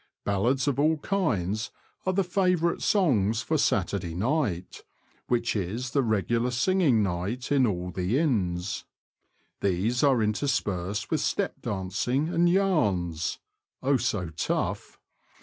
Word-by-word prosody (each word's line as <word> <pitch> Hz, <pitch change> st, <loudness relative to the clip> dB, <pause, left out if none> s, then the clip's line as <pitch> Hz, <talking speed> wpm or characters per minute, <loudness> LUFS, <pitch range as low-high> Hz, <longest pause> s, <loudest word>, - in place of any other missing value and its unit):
Ballads 120 Hz, +8 st, +1 dB
of 140 Hz, -1 st, 0 dB
all 155 Hz, +2 st, +3 dB
kinds 115 Hz, -, -1 dB, 0.4 s
are 185 Hz, -, +2 dB
the 195 Hz, +1 st, +2 dB
favourite 180 Hz, -2 st, +1 dB
songs 115 Hz, -, +2 dB
for 160 Hz, -, -1 dB
Saturday 90 Hz, -7 st, 0 dB
night 105 Hz, -, -1 dB, 0.2 s
— -, -, -37 dB
which 120 Hz, -1 st, 0 dB
is 110 Hz, +6 st, -3 dB
the 140 Hz, -, +2 dB
regular 115 Hz, +1 st, +1 dB
singing 135 Hz, -, +2 dB
night 100 Hz, +8 st, -3 dB
in 135 Hz, -3 st, +4 dB
all 90 Hz, -3 st, -2 dB
the 95 Hz, +7 st, 0 dB
inns. 100 Hz, -, 0 dB, 0.8 s
These 100 Hz, +6 st, 0 dB
are 135 Hz, -6 st, +4 dB
interspersed 105 Hz, -4 st, -1 dB
with -, -, +1 dB
step -, -, -1 dB
dancing 105 Hz, -, -1 dB
and 175 Hz, 0 st, +3 dB
yarns 105 Hz, -, +1 dB, 0.5 s
(oh, 135 Hz, +1 st, +3 dB
so 105 Hz, -9 st, -1 dB
tough!). 75 Hz, -, -2 dB
120 Hz, 130 wpm, -27 LUFS, 95-145 Hz, 0.8 s, in